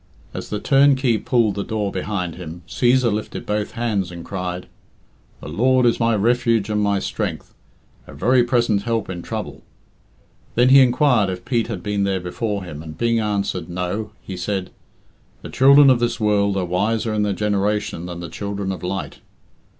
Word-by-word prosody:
As - - -6
the 105 - -3
turnkey 135 -4 +3
pulled 115 -5 +1
the 100 +1 -3
door 105 -2 -2
behind 95 -2 -3
him, 85 0 -9
Cæsar 120 +3 +2
lifted 105 +1 -5
both 105 0 -2
hands 110 -6 -1
and 85 -1 -9
cried, 90 -2 -4 0.8
"The - - -8
Lord 125 +10 +2
is 120 - +2
my 115 -1 +2
refuge 115 -1 +1
and 105 0 +1
my 100 -1 +1
strength; - - -4 0.5
a - - -11
very 125 +1 +3
present 120 -4 +1
help 115 -2 -2
in 90 -2 -6
trouble." - - -6 0.9
Then 125 +2 +4
he 135 +1 +8
inquired 125 -4 +3
if 90 -1 -6
Pete 120 -3 0
had 100 -7 -5
been 105 0 -1
there 95 -1 0
before 100 +3 -3
him, 80 -4 -8
and 80 -1 -9
being 115 -1 +1
answered 100 -5 -2
"No," 90 +4 -3
he 95 - -7
said, 90 +1 -3 0.7
"The - - -7
children 140 +1 +7
of 125 - +3
this 120 0 -1
world 100 -2 +2
are 95 - 0
wiser 110 +5 0
in 105 - 0
their 105 -1 +1
generation 105 -3 -1
than 85 -1 -7
the 85 - -5
children 100 -1 -4
of 95 - -6
light." 95 +1 -4
105 Hz, 180 wpm, -21 LUFS, 95-115 Hz, 0.9 s, he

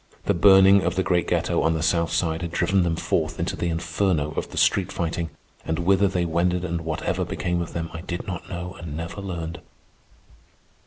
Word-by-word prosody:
The - - +3
burning 95 +2 +7
of 90 -1 -1
the 95 - +1
great 90 -4 +1
ghetto - - +1
on 80 0 +2
the 80 - -2
South 85 0 +1
Side 80 0 0
had 85 - -3
driven 95 +3 +2
them 85 -2 +1
forth - - -1
into - - -1
the 85 - -2
inferno 80 -1 0
of - - -3
the - - -9
street 95 -1 +2
fighting, 85 -2 -2 0.3
and 80 0 -2
whither 95 +3 +3
they 90 -2 0
wended 90 +2 0
and 85 -1 -2
whatever 80 -1 -2
became 90 -1 -2
of 85 - -5
them 85 -1 -3
I 80 - -6
did 85 0 -5
not 90 -2 -6
know 90 0 -5
and 80 -3 -6
never 80 +4 -5
learned. 85 -3 -5
85 Hz, 205 wpm, -24 LUFS, 80-90 Hz, 0.3 s, burning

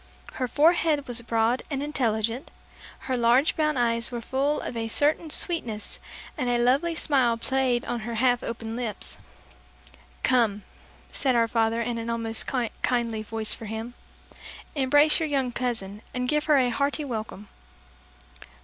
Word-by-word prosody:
Her 255 - -2
forehead 305 0 +3
was 240 -1 +1
broad 230 +1 +1
and 280 -2 -2
intelligent, 235 -2 -1 0.5
her 260 -1 -2
large 245 +4 +3
brown 305 -2 +1
eyes 235 -1 +1
were 240 - -4
full 275 +5 0
of - - -5
a 225 -1 -2
certain 300 +7 +1
sweetness, 245 - -2 0.4
and 255 -5 -1
a 240 - +2
lovely 275 +8 +2
smile 260 -7 +2
played 255 0 0
on 240 - -2
her 230 +1 -5
half 245 +1 +2
opened 230 -1 -5
lips. 230 -5 -4 1.1
"Come," 225 -5 +2 0.5
said 265 -3 0
our 230 -1 +3
father 225 0 +1
in 235 0 -3
an 230 0 -4
almost 230 -1 0 0.3
kindly 235 -3 0
voice 220 0 0
for 225 - -8
him; 220 +3 -5 0.8
"Embrace 290 +2 +4
your 320 -2 -1
young 270 -3 0
cousin, 225 -5 -3
and 250 0 -1
give 300 +2 +1
her 300 -2 +4
a 255 -2 +3
hearty 285 +3 0
welcome." 215 -5 -5
245 Hz, 150 wpm, -26 LUFS, 230-280 Hz, 1.1 s, Embrace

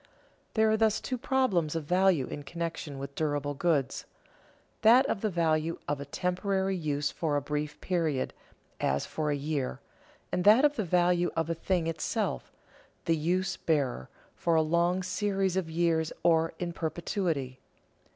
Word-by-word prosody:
There 220 -1 +4
are 220 - +3
thus 220 -1 +2
two 255 - -3
problems 235 - +1
of 165 - -2
value 180 -3 +3
in 145 - -6
connection 165 -1 -5
with 140 0 -6
durable 145 -1 -1
goods: 145 -3 0 0.8
that 245 +5 +7
of 195 - -1
the 215 - +1
value 165 -2 +1
of 145 -1 -2
a - - -5
temporary 190 +5 -1
use 150 -4 -1
for 155 -3 -1
a - - +2
brief 150 +1 -3
period, 165 -7 -1 0.5
as 70 +1 0
for 155 -1 -2
a 145 - +1
year; 140 -2 -2 0.5
and 180 - 0
that 220 +8 +7
of 295 0 +3
the 215 - -1
value 175 0 +2
of 165 0 0
a - - +2
thing 170 +1 -1
itself, 165 -1 -2 0.5
the 165 - +3
use 180 +4 0
bearer, 135 - -1 0.2
for 170 -1 0
a 160 - +4
long 170 +3 +1
series 195 0 0
of 185 -4 -1
years 160 -1 +1
or 165 -1 +3
in 175 -1 -3
perpetuity. 160 -5 -2
165 Hz, 160 wpm, -29 LUFS, 150-185 Hz, 0.8 s, that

